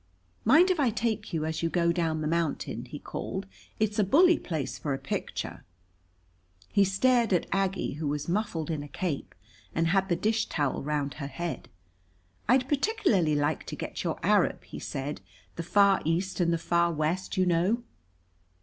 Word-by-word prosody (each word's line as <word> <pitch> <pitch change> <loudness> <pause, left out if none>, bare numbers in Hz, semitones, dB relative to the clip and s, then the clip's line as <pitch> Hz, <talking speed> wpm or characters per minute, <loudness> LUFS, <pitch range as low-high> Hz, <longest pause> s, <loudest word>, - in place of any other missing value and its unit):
"Mind 320 - +6
if 360 - 0
I 270 -4 +4
take 220 -2 -2
you 160 -3 -1
as 160 0 -2
you 165 - +1
go 170 0 +2
down 165 -2 0
the 155 - -1
mountain?" 165 -1 -1
he - - -8
called. - - -5 0.3
"It's 215 -1 0
a - - +5
bully 335 - +5
place 155 -6 -4
for 145 -3 -1
a - - -4
picture." - - -4 1.1
He 200 - +5
stared 230 +4 +3
at 175 - +2
Aggie, 195 -4 0
who 150 +1 -3
was 145 0 -2
muffled 175 -4 -1
in 155 -2 -2
a 145 - -7
cape 160 -1 -4 0.4
and 165 0 +2
had 190 +1 +2
the 175 - +3
dish 220 +4 0
towel 145 -4 -1
round 145 -1 -1
her 140 - -3
head. 165 +5 -5 0.8
"I'd 255 +1 +4
particularly 265 - +2
like 145 0 0
to - - -4
get - - -5
your - - -1
Arab," - - +3
he - - -9
said. 140 +2 -4 0.3
"The - - -3
Far 195 +3 +4
East 175 +5 -1
and 170 -1 +3
the 170 - +2
Far 170 +1 +2
West, 165 +6 -1
you 185 - +4
know." 180 +7 +2
175 Hz, 180 wpm, -28 LUFS, 155-210 Hz, 1.1 s, Mind